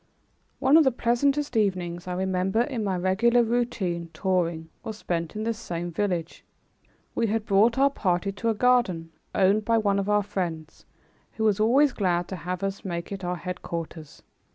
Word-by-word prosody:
One 275 Hz, +4 st, +5 dB
of 325 Hz, -, +7 dB
the 265 Hz, -, +3 dB
pleasantest 265 Hz, +4 st, 0 dB
evenings 185 Hz, -4 st, -1 dB
I 180 Hz, -, -2 dB
remember 190 Hz, +3 st, 0 dB
in 245 Hz, -3 st, -2 dB
my 190 Hz, -3 st, -1 dB
regular 225 Hz, +7 st, +3 dB
routine 220 Hz, -8 st, -1 dB
touring 170 Hz, -4 st, -1 dB
was 220 Hz, -1 st, -6 dB
spent 170 Hz, -4 st, -3 dB
in 215 Hz, -, -3 dB
this 230 Hz, -1 st, -2 dB
same 175 Hz, -5 st, -4 dB
village. 175 Hz, -2 st, -2 dB, 0.7 s
We 230 Hz, -, +1 dB
had 220 Hz, 0 st, -1 dB
brought 215 Hz, +5 st, +3 dB
our 275 Hz, +1 st, +4 dB
party 185 Hz, -5 st, 0 dB
to 200 Hz, +4 st, -2 dB
a 225 Hz, -, +1 dB
garden, 205 Hz, -9 st, +2 dB, 0.2 s
owned 200 Hz, +3 st, +3 dB
by 230 Hz, +2 st, +2 dB
one 200 Hz, -2 st, +2 dB
of 200 Hz, +1 st, -2 dB
our 210 Hz, 0 st, +3 dB
friends 165 Hz, -5 st, -5 dB, 0.5 s
who 220 Hz, -, -3 dB
was 215 Hz, -2 st, +2 dB
always 265 Hz, +7 st, +4 dB
glad 175 Hz, -3 st, 0 dB
to 190 Hz, -, -4 dB
have 180 Hz, +1 st, -5 dB
us 195 Hz, 0 st, -3 dB
make 170 Hz, -1 st, -4 dB
it 195 Hz, -1 st, -5 dB
our 180 Hz, 0 st, -1 dB
headquarters. 170 Hz, -3 st, -6 dB
195 Hz, 175 wpm, -26 LUFS, 175-230 Hz, 0.7 s, of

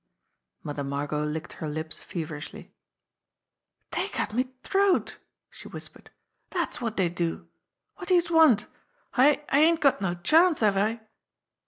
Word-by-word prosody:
Mother 145 Hz, -1 st, -4 dB
Margot 145 Hz, +2 st, -2 dB
licked 155 Hz, +1 st, -4 dB
her 155 Hz, -, -5 dB
lips 155 Hz, +1 st, -5 dB
feverishly. 160 Hz, -4 st, -7 dB, 1.2 s
"Dey'd -, -, -1 dB
cut -, -, -3 dB
me 250 Hz, +3 st, +1 dB, 0.2 s
t'roat 395 Hz, -1 st, +1 dB
!" -, -, -61 dB
she -, -, -12 dB
whispered. -, -, -11 dB, 0.4 s
"Dat's 345 Hz, -8 st, -2 dB
wot 230 Hz, -2 st, -3 dB
dey'd 175 Hz, -3 st, +1 dB
do. 170 Hz, -2 st, -3 dB, 0.5 s
Wot 360 Hz, -, -7 dB
do 370 Hz, -, +4 dB
youse 345 Hz, -1 st, +2 dB
want? 310 Hz, -11 st, +5 dB, 0.5 s
I 290 Hz, +3 st, +4 dB
I 280 Hz, -, +3 dB
ain't 325 Hz, +2 st, +4 dB
got 275 Hz, -9 st, +3 dB
no 175 Hz, -3 st, -1 dB
chance, 320 Hz, -, +3 dB
have 210 Hz, -2 st, +3 dB
I?" 220 Hz, +4 st, 0 dB
215 Hz, 150 wpm, -27 LUFS, -, 1.2 s, want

